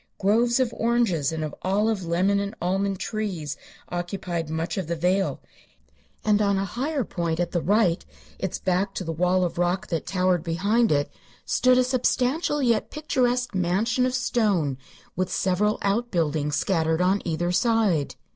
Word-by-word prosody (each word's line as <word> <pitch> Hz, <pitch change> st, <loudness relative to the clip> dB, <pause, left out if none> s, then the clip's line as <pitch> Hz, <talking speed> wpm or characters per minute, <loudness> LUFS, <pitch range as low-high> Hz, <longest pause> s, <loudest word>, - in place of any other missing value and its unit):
Groves 235 Hz, +5 st, +2 dB
of 250 Hz, -3 st, +1 dB
oranges 225 Hz, -, +1 dB
and 160 Hz, -1 st, -3 dB
of 155 Hz, -, -4 dB
olive, 205 Hz, +1 st, +1 dB
lemon 185 Hz, +4 st, +1 dB
and 200 Hz, +2 st, -3 dB
almond 195 Hz, +2 st, 0 dB
trees 190 Hz, -9 st, -3 dB, 0.3 s
occupied 175 Hz, -2 st, -3 dB
much 160 Hz, +2 st, -2 dB
of 190 Hz, -5 st, -3 dB
the 170 Hz, -, -1 dB
vale, 185 Hz, +4 st, 0 dB, 0.8 s
and 210 Hz, -1 st, +3 dB
on 200 Hz, -1 st, +2 dB
a 195 Hz, -, 0 dB
higher 270 Hz, -, -2 dB
point 170 Hz, -5 st, -2 dB
at 175 Hz, -, -1 dB
the 175 Hz, -, 0 dB
right, 200 Hz, -3 st, +2 dB, 0.4 s
its 190 Hz, -, -2 dB
back 190 Hz, +2 st, -1 dB
to -, -, -3 dB
the 165 Hz, -, -3 dB
wall 180 Hz, +3 st, +2 dB
of 170 Hz, 0 st, -4 dB
rock 175 Hz, +1 st, +1 dB
that 165 Hz, -2 st, -2 dB
towered 185 Hz, -2 st, +1 dB
behind 200 Hz, +7 st, +1 dB
it, 145 Hz, -1 st, +1 dB, 0.3 s
stood 255 Hz, 0 st, +3 dB
a 255 Hz, -, +5 dB
substantial 260 Hz, +4 st, +1 dB
yet 235 Hz, -4 st, +1 dB
picturesque 250 Hz, -5 st, 0 dB
mansion 195 Hz, +8 st, +1 dB
of 255 Hz, -, -2 dB
stone, 195 Hz, -, +1 dB, 0.4 s
with 185 Hz, 0 st, -1 dB
several 200 Hz, +4 st, +1 dB
outbuildings 165 Hz, -9 st, 0 dB
scattered 160 Hz, -3 st, +1 dB
on 190 Hz, +2 st, +2 dB
either 175 Hz, +1 st, -1 dB
side. 195 Hz, -, +1 dB
190 Hz, 160 wpm, -25 LUFS, 170-225 Hz, 0.8 s, a